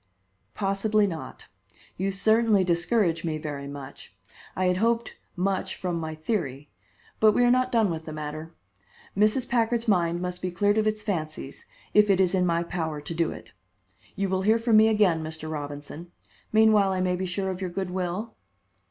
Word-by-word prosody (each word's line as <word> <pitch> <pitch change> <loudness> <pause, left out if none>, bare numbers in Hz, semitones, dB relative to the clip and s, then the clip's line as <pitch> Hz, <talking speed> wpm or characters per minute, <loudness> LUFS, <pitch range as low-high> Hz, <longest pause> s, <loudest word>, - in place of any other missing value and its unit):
"Possibly 205 +1 +1
not. 165 -5 -6 0.5
You 190 +2 -1
certainly 220 0 +3
discourage 175 0 +1
me 160 -2 -2
very 145 -2 -6
much. 140 -1 -10 0.4
I 185 - 0
had 180 0 +2
hoped 230 +3 0 0.2
much 190 0 -1
from 175 -2 -3
my 160 -1 -4
theory. 150 - -3 0.5
But 215 -1 +5
we 245 - +3
are 245 - +5
not 255 0 +2
done 225 -5 +3
with 160 -1 -5
the 155 - -6
matter. 155 +1 -6 0.6
Mrs. 215 +5 +2
Packard's 235 0 0
mind 175 -4 +2
must 180 0 -4
be 185 - -2
cleared 205 +4 +2
of 215 - +1
its 215 0 -1
fancies, 155 -8 -4 0.3
if 210 0 +5
it 195 -2 +4
is 185 -1 +3
in 180 -1 +2
my 170 0 +1
power 160 -3 -3
to 150 +3 -6
do 165 -1 0
it. - - -11 0.6
You 195 0 -1
will 190 0 0
hear 215 +4 +4
from 230 -1 +3
me 220 +1 +7
again, 205 -7 +3
Mr. 155 0 -6
Robinson. 145 +3 -7 0.4
Meanwhile, 215 -3 +4
I 185 - -1
may 185 0 +1
be 185 +1 -3
sure 190 +1 -2
of 185 +1 -6
your 185 - -2
good 185 +1 -4
will?" 185 +5 -3
185 Hz, 185 wpm, -26 LUFS, 165-215 Hz, 0.6 s, me